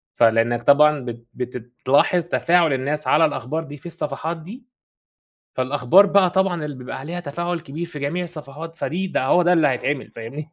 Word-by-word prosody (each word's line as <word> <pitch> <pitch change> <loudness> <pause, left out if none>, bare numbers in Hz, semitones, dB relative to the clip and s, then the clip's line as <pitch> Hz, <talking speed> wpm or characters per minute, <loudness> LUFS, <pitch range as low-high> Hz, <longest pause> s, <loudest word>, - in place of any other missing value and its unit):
فلإنك 115 +1 +3
طبعًا 150 +3 +5
بت 120 -1 -7
بتتلاحظ 125 +7 0
تفاعل 170 -2 +2
الناس 145 +3 -2
على 155 +2 +5
الأخبار 150 +2 -3
دي 145 -2 -10
في - - -24
الصفحات 165 -1 -4
دي. 205 +10 -11 0.9
فالأخبار 135 +8 +4
بقى 195 -2 +4
طبعًا 185 -3 0
اللي 145 -2 -6
بيبقى 125 0 -7
عليها 170 +5 -5
تفاعل 170 +2 -3
كبير 160 +1 -6
في 160 -3 -9
جميع 150 +6 -2
الصفحات 160 -1 -9
فدي 185 +3 -3
بقى 130 -7 -1
هو 180 - +4
ده 175 +1 +3
اللي 160 -4 +4
هيتعمل 135 +1 -2
فاهمني. 140 +7 -8
150 Hz, 170 wpm, -22 LUFS, 130-175 Hz, 0.9 s, طبعًا